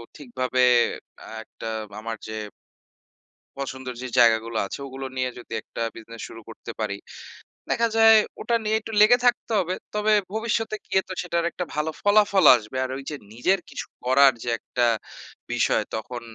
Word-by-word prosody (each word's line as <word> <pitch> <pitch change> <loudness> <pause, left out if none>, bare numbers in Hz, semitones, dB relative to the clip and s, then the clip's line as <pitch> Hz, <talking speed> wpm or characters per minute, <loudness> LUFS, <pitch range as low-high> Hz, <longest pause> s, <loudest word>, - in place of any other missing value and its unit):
ঠিকভাবে 130 -2 -1 0.8
একটা 115 - -8 0.3
আমার 115 0 -5
যে 110 0 -5 1.2
পছন্দের 130 -2 -5
যে 130 - -4
জায়গাগুলো 115 -1 +4
আছে - - -7
ওগুলো 135 0 -7
নিয়ে 130 0 0
যদি 115 - -10
একটা - - -8
বিজনেস 115 0 -10
শুরু 115 - -10
করতে 115 - -9
পারি। 105 -2 -2 0.7
দেখা 230 0 +2
যায় 225 0 +8 0.2
ওটা 235 - +1
নিয়ে 215 +1 +1
একটু 225 - -9
লেগে 240 +4 +7
থাকতে 245 -1 +2
হবে। 185 0 -1 0.2
তবে 210 +1 +2 0.2
ভবিষ্যতে 225 0 -1
গিয়ে 190 - +2
তো 190 - -5
সেটার 170 -1 -1
একটা 180 - -4
ভালো 150 +1 -1
ফলাফলও 205 -2 +5
আসবে 110 +3 -8
আর 130 - -6
ওই 135 - -8
যে 150 - -4 0.2
নিজের 185 +12 +1
কিছু - - -6 0.2
করার 135 +1 +6
যে 120 - -3
একটা 120 -1 -1 0.7
বিষয় - - +2
তখন 120 +2 -5
135 Hz, 160 wpm, -24 LUFS, -, 1.2 s, যায়